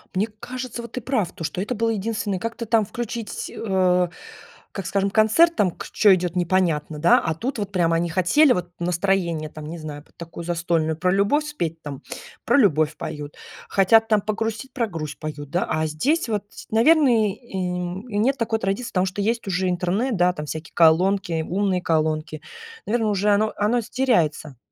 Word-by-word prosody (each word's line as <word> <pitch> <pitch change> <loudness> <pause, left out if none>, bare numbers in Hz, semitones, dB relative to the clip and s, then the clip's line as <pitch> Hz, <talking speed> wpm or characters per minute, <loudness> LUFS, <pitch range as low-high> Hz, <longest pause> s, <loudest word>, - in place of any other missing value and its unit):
Мне 200 +4 +1
кажется, 250 -1 -6
вот 235 -1 -10
ты 255 - -4
прав, 215 -8 -1
то 165 - -9
что 180 - -3
это 220 +5 -2
было 230 0 0
единственное, 215 -2 -2
как-то 230 +3 -4
там 220 -1 +2
включить, 230 0 -5
э, 180 -4 +1 0.6
как 195 -4 -5
скажем, 200 +1 0
концерт, 220 - +4
там 185 -4 +2
к - - -9
чё 205 -3 +5
идет 180 -1 -1
непонятно, 165 -4 0
да. 170 +2 +5
А 160 - -1
тут 235 - -4
вот 200 -1 -3
прямо 170 -3 +2
они 170 0 0
хотели 220 - +4
вот 175 -4 -1
настроение, 175 -3 0
там 155 -1 -9
не 170 - -6
знаю, 150 -2 -8
под - - -30
такую 170 0 -8
застольную, 165 -2 0
про 180 +1 +1
любовь 205 +11 +2
спеть, 165 - -4
там- 140 -2 -7 0.4
про - - +4
любовь 155 - +3
поют. 150 -1 -6 0.3
Хотят 225 +4 +4
там 215 -1 +4
погрустить- 225 +4 -3
про 240 -4 0
грусть 155 -5 -6
поют, 145 -2 -6
да. 175 - 0
А 155 0 0
здесь 275 - 0
вот, 210 -3 -1
ть - - -12
наверно 290 +6 +5 0.2
и, 235 +4 -10
м, 180 +3 -3
и 205 - -3
нет 260 +6 +2
такой 225 -1 -1
традиции, 195 +5 -2
потому 185 0 +1
что 190 +2 -3
есть 230 0 -1
уже 185 0 0
интернет. 190 +7 0
Да 180 +1 +3
там 150 -3 -6
всякие 160 +2 -7
колонки, 175 +1 +3
умные 190 -1 0
колонки, 155 -1 -1 0.4
наверно 225 0 0
уже 205 +1 +1
оно 215 +1 +2
оно 215 +4 +2
с 225 - -12
теряется. 160 - 0
190 Hz, 190 wpm, -23 LUFS, 165-225 Hz, 0.6 s, чё